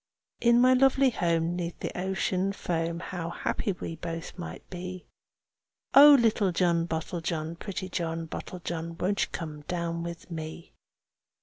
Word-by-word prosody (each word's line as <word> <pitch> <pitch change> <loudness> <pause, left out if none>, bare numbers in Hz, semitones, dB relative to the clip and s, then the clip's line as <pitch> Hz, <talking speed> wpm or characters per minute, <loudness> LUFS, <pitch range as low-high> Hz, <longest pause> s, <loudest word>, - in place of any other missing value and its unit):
In 235 0 +5
my 255 +1 +6
lovely 270 0 +4
home 170 -4 +1
'neath 175 -1 -4
the - - -4
ocean 190 +1 0
foam, 170 -2 -2
How 175 -2 -4
happy 200 - -2
we 165 -2 -6
both 165 +1 -6
might 175 - -8
be! 185 0 -6 0.9
Oh! 290 +1 +10
little 215 -4 +3
John 170 -1 +2
Bottlejohn, 165 0 -3
pretty 190 -2 -4
John 165 -2 -3
Bottlejohn, 170 -1 -5
Won't 200 +3 +1
you - - -21
come 155 -3 -5
down 170 -1 -2
with 170 +1 -7
me?" 160 0 -7
175 Hz, 140 wpm, -28 LUFS, 165-190 Hz, 0.9 s, Oh